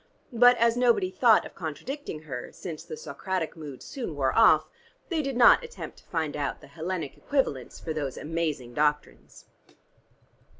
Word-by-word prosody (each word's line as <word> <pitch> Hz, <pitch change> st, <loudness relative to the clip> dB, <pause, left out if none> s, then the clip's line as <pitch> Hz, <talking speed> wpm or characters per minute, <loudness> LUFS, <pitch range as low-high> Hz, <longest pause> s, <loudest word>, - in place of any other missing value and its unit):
But 245 Hz, +1 st, +6 dB
as 235 Hz, 0 st, +3 dB
nobody 235 Hz, -7 st, +3 dB
thought 230 Hz, +1 st, +4 dB
of -, -, -10 dB
contradicting 165 Hz, -, -6 dB
her, 130 Hz, -5 st, -6 dB
since 160 Hz, -4 st, -7 dB
the 155 Hz, -, -8 dB
Socratic 160 Hz, +4 st, -4 dB
mood 150 Hz, -5 st, -9 dB
soon 240 Hz, -, -6 dB
wore 135 Hz, -2 st, 0 dB
off, 225 Hz, -1 st, +6 dB, 0.4 s
they 330 Hz, -4 st, 0 dB
did 275 Hz, -3 st, -3 dB
not 250 Hz, -, +7 dB
attempt 480 Hz, 0 st, -9 dB
to -, -, -24 dB
find 160 Hz, -3 st, -2 dB
out 145 Hz, -1 st, -2 dB
the -, -, -14 dB
Hellenic 160 Hz, -1 st, -4 dB
equivalents 205 Hz, -, -1 dB
for 160 Hz, -, -4 dB
those 145 Hz, -4 st, -3 dB
amazing 155 Hz, -6 st, -3 dB
doctrines. 150 Hz, +2 st, -2 dB
165 Hz, 160 wpm, -27 LUFS, 150-235 Hz, 0.4 s, not